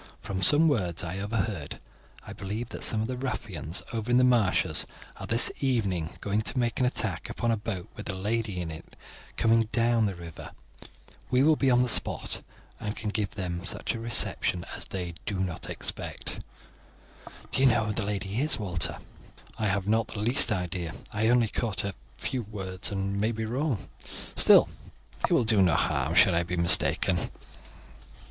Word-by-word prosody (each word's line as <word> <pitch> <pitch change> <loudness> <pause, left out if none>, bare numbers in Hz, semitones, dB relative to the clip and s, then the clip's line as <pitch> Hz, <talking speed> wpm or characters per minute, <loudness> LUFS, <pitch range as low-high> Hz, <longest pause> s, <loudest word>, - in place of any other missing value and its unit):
"From 95 -1 -4
some 145 - +6
words 90 - 0
I 90 +3 -4
overheard 100 -6 -3 0.5
I - - -8
believe 110 +5 -5
that - - -6
some 110 -1 +1
of - - -3
the 130 - -3
ruffians 100 - -3
over 115 0 -3
in 125 - +4
the 130 - +5
marshes 120 -7 +2 0.3
are - - -7
this 115 +1 +6
evening 100 - -1
going 105 +1 0
to 125 +4 -4
make 120 -2 0
an 125 - +3
attack 105 -8 -1
upon 120 -1 -1
a - - +2
boat 105 -4 -5
with - - -7
a 95 - -2
lady 105 0 -2
in 85 -2 -4
it 80 - -11 0.4
coming 115 -1 +3
down 115 -2 +2
the 95 - -4
river. 85 -2 -10 0.8
We 125 +1 +3
will 155 +1 +5
be 135 -2 +1
on 125 0 +4
the - - 0
spot, 115 - 0 0.4
and 105 +1 -4
can 105 -2 -4
give 105 -2 -2
them 90 -3 -3
a 95 +5 -3
reception 110 -6 +1
such - - -6
as - - -5
they 90 -2 -5
do 100 -3 -2
not 90 -3 -3
expect." - - -4 1.1
"Do - - +2
you 135 - +6
know 115 -3 +3
who 105 - -2
the 115 - -2
lady 100 +1 -3
is, 155 +2 +3
Walter?" 90 -6 -2 0.6
"I 110 - +1
have 100 0 -1
not 110 +1 +2
the 105 - -5
least 120 +1 +4
idea. 90 -4 -2 0.2
I 110 +1 +1
only 120 -1 +4
caught 110 -1 -2
a 100 0 -3 0.2
few 130 - -2
words, 95 -3 -4
and 100 0 -2
may 110 +2 +1
be 110 -1 -3
wrong; 125 0 -2 0.5
still, - - +7 0.6
it - - -7
will - - +4
do 110 -3 +5
no 90 -4 +4
harm - - 0
should - - +6
I 85 - +2
be 90 +1 -3
mistaken." 85 +1 +4
105 Hz, 185 wpm, -27 LUFS, 95-115 Hz, 1.1 s, still